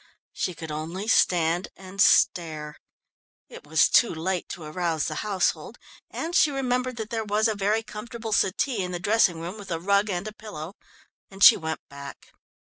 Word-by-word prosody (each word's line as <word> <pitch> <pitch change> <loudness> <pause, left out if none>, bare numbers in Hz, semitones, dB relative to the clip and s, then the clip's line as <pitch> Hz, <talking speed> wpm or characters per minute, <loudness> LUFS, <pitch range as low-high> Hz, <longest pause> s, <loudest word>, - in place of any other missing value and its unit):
She 180 - -3
could 160 -1 -7
only 165 +7 -5
stand 175 -4 +2
and 195 +1 -5
stare. 155 -6 +2 0.7
It - - -12
was 160 +2 +4
too 235 - +4
late 175 +2 -3
to 170 - -7
arouse 160 0 -2
the 155 - -3
household, 200 -3 -1 0.3
and 330 +2 -5
she 310 - +5
remembered 255 -2 -1
that 220 -1 -6
there 225 -1 -1
was 215 +1 +1
a 220 - 0
very 210 +2 0
comfortable 220 +1 -7
settee 205 +4 +1
in 180 0 -5
the 175 - -3
dressing 195 -3 +2
room 175 +6 -6
with 200 -2 -10
a 165 -2 -2
rug 200 +4 +2
and 185 +1 -3
a 215 - -7
pillow, 200 -6 -8 0.6
and 195 +1 -3
she 230 - +10
went 160 -2 -4
back. 140 0 -11
190 Hz, 180 wpm, -25 LUFS, 165-215 Hz, 0.7 s, she